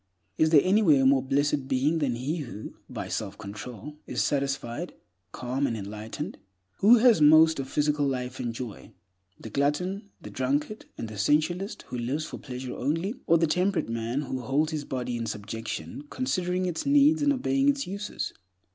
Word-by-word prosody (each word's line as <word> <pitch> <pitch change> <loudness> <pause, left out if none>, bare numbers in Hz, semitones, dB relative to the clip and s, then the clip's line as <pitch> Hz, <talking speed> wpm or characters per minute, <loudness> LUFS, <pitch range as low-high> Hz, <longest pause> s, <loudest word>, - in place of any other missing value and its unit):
Is 160 - +5
there 155 -3 +7
anywhere 185 -8 +4
a - - +3
more 135 0 +5
blessed 140 +1 0
being 140 +5 +1
than 135 -6 0
he 135 +8 -2
who, 120 -8 -7 0.2
by - - -5
self - - -4
control, 110 +7 -8
is - - 0
satisfied, 140 +2 -2 0.4
calm, 130 +5 -1
and 115 - -2
enlightened? 110 - -6 0.4
Who 220 +5 +7
has 230 -7 +5
most 155 +1 +7
of 135 -1 -4
physical 150 -1 +1
life 125 -1 -3
and 120 -2 -2
joy—the 100 -4 -11
glutton, 180 - -1
the - - -10
drunkard, 145 +11 -1
and 115 - -4
the 110 -2 -8
sensualist 165 - +1
who 125 - -4
lives 135 +7 -2
for - - -7
pleasure 125 -2 -6
only, 165 - -1
or 170 - +6
the 165 - +3
temperate 180 -2 +1
man 115 +4 -2
who 130 -1 -4
holds 145 +6 +1
his 150 -2 -3
body 125 -2 -3
in 115 -1 -3
subjection, 110 - -5
considering 185 -8 -1
its 175 -3 -2
needs 290 +2 +5
and 290 0 +4
obeying 275 +1 +2
its 280 -1 +1
uses? 200 +3 -4
145 Hz, 175 wpm, -27 LUFS, 125-175 Hz, 0.4 s, there